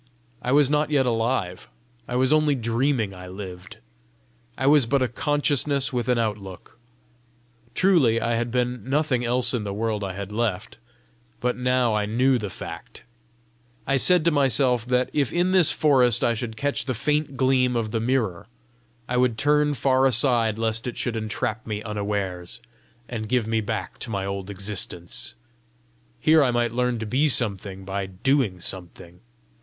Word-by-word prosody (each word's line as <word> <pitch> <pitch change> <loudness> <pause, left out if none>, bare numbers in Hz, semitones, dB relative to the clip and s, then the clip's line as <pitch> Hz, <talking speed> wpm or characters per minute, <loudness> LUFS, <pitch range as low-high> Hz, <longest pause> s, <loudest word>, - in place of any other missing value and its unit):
I 125 - -2
was 145 0 +5
not 150 +1 +1
yet 140 -3 +2
alive; 115 -6 -1 0.4
I 125 - -4
was 130 +3 +3
only 155 -2 +3
dreaming 115 -2 0
I 90 0 -10
lived! 95 +2 -9 0.8
I 135 - -2
was 140 -3 +5
but 135 +1 +2
a - - +1
consciousness 145 +1 0
with 120 0 -2
an 125 - +3
outlook! 105 -2 -5 1.0
Truly 155 -12 +3
I 115 +1 -1
had 120 +1 -1
been 125 -1 -2
nothing 135 -3 +1
else 125 +2 +3
in 120 -4 -1
the 100 -1 -4
world 110 -1 -2
I 95 -1 -4
had 100 +1 -7
left, 105 -3 -3 0.6
but 125 0 -1
now 125 -2 +1
I 105 -1 0
knew 125 +4 +2
the 105 -2 -4
fact! - - -9 0.8
I 135 - +1
said 175 +4 +5
to 170 - +4
myself 130 -4 +2
that 125 0 +1
if 140 -5 0
in 175 +2 +1
this 185 -4 +5
forest 125 -6 +3
I 120 - +3
should 110 -1 -5
catch 145 +4 -2
the 130 - -2
faint 150 +3 -1
gleam 130 -1 +2
of 110 -2 -2
the 115 - -1
mirror, 110 -6 -1 0.6
I 125 - -1
would 125 -2 +2
turn 150 +3 +2
far 130 +1 +2
aside 120 -4 +3
lest 115 +1 -1
it 120 - -5
should 120 -2 -2
entrap 110 0 -3
me 105 -1 -4
unawares, 100 -2 -4 0.5
and 110 -3 -5
give 125 -2 +1
me 110 0 0
back 105 - -5
to - - -5
my 100 -3 -3
old 100 0 -5
existence: 100 -3 -4 0.8
here 155 +4 +5
I 130 - +2
might 120 -1 0
learn 125 0 0
to 110 - -5
be 135 +8 +1
something 100 -7 -1
by 95 0 -3
doing 100 0 0
something! 90 -1 -5
120 Hz, 170 wpm, -24 LUFS, 105-135 Hz, 1.0 s, was